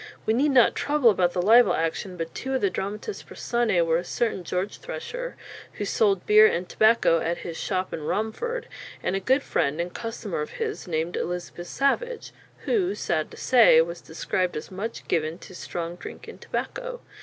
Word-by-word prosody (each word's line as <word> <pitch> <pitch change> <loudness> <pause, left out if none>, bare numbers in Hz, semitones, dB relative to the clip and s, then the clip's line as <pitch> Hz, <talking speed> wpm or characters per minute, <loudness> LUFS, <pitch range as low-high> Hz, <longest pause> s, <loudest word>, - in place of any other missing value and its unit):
We 220 - +2
need 275 +6 +3
not 255 -4 +5
trouble 290 -5 +3
about 180 -3 +1
the 180 - 0
libel 235 +5 +6
action, 170 +3 -2
but 165 -1 -5
two 265 0 -3
of 260 - 0
the 200 - +2
dramatis 210 - -4
personæ 225 -8 0
were 165 0 +2
a - - -5
certain 215 0 -1
George 180 +4 -3
Thresher, - - -6 0.4
who 205 - -4
sold 200 -2 +2
beer 215 +1 +8
and 175 -2 -1
tobacco 215 -6 +4
at 170 +2 -1
his 170 - -5
"shopp 185 +2 -2
in 160 - -4
Romford," 220 - -2 0.4
and 190 - 0
a - - +1
good 265 +8 +2
friend 140 +3 0
and 175 +1 -3
customer 225 -7 -4
of 150 - -5
his 440 - -4
named 165 +1 -2
Elizabeth 175 0 -4
Savage, 475 - -1 0.3
who, 395 -3 +1
sad - - -1
to - - -13
say, 235 -10 +6
was 170 +1 0
described 175 +2 -2
as 150 - -7
much 205 +5 -5
given 160 0 0
to 185 - -13
"stronge 175 0 -5
drincke - - -9
and - - -11
tobacco." - - -4
200 Hz, 190 wpm, -25 LUFS, 175-255 Hz, 0.4 s, beer